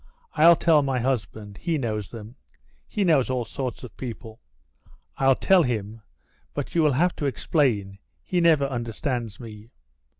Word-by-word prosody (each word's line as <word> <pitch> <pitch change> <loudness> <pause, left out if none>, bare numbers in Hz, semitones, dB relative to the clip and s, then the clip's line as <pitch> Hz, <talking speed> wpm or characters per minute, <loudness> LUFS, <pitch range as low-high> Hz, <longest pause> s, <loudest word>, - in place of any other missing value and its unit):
I'll 170 +2 +7
tell 160 -2 +4
my 135 -2 -1
husband, 110 -5 -3
he 165 -2 -1
knows 110 -7 -3
them. 115 +1 -10 0.5
He 210 - -1
knows 155 -9 +3
all 125 -2 -1
sorts 125 +2 -5
of 125 - -10
people. 115 -2 -8 0.8
I'll 135 -1 +4
tell 190 +5 +4
him, 110 -5 -3 0.5
but 145 - -4
you 170 - +3
will 150 -3 +3
have 175 +7 +1
to 145 - -1
explain, 105 - 0 0.2
he 180 -1 0
never 160 -4 +4
understands 120 -2 -4
me. 110 -2 -11
125 Hz, 155 wpm, -25 LUFS, 110-150 Hz, 0.8 s, I'll